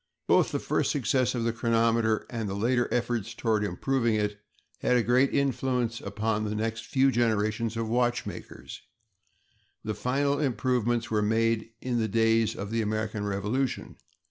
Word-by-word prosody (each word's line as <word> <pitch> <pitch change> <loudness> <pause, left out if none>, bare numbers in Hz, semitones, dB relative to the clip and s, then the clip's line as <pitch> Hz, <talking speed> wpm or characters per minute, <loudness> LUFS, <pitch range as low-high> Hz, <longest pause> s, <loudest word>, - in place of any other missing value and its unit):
Both - - +3
the - - 0
first - - 0
success 130 -2 +1
of 120 - -1
the 115 0 0
chronometer 115 -1 +1
and 115 -4 -4
the 95 - -3
later 120 +4 +1
efforts 115 -2 -1
toward 110 -3 0
improving 115 +4 0
it 105 -1 -1 0.4
had 125 - +2
a 120 - +2
great 125 +4 +3
influence 125 -4 0
upon 105 +1 -2
the 105 0 -3
next 110 +1 -3
few 135 -2 +3
generations 115 -1 0
of 115 -1 -2
watchmakers; 120 +1 -3 1.0
the 110 - -2
final 140 +5 0
improvements 120 -3 0
were 105 -1 +2
made 115 +1 +1
in 125 -2 -1
the 110 - +1
days 115 +1 +2
of 100 +1 -6
the 115 0 0
American 110 0 -2
Revolution. 105 +7 -2
115 Hz, 155 wpm, -28 LUFS, 110-125 Hz, 1.0 s, Both